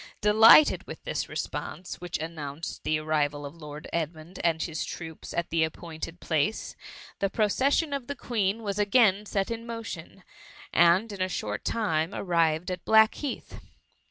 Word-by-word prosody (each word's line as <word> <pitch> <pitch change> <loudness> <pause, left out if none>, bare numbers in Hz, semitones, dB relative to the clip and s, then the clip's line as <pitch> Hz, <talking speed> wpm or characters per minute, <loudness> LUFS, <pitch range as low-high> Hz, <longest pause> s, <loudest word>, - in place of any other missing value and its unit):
Delighted 220 +8 +7
with, - - -9
this - - -3
re - - -9
sponse, 180 - -5
which 175 -1 -3
announced 155 -1 -6
the 155 - +1
arrival 150 -2 -1
of 140 - -7
Lord 150 -2 -9
Edmund 165 +2 -4
and 165 -2 +2
his 160 -1 -3
troops 160 -2 -7
at 170 - -2
the 165 -1 +3
appointed 165 +1 -6
place, 160 +6 -1 0.4
the 195 - +1
procession 270 - +1
of 275 -4 -3
the 285 - -4
Queen 225 -3 -1
was 200 -1 -2
again 210 -1 +4
set 195 +2 -1
in 230 0 -4
motion, 205 -6 -7 0.5
and 175 +6 +4
in 200 -2 -6
a 185 - +1
short 105 - -3
time 165 -6 0
arrived 170 -1 +1
at 180 -1 -5
Black* 220 0 +6
heath. 285 -4 -6
180 Hz, 160 wpm, -27 LUFS, 160-215 Hz, 0.5 s, Delighted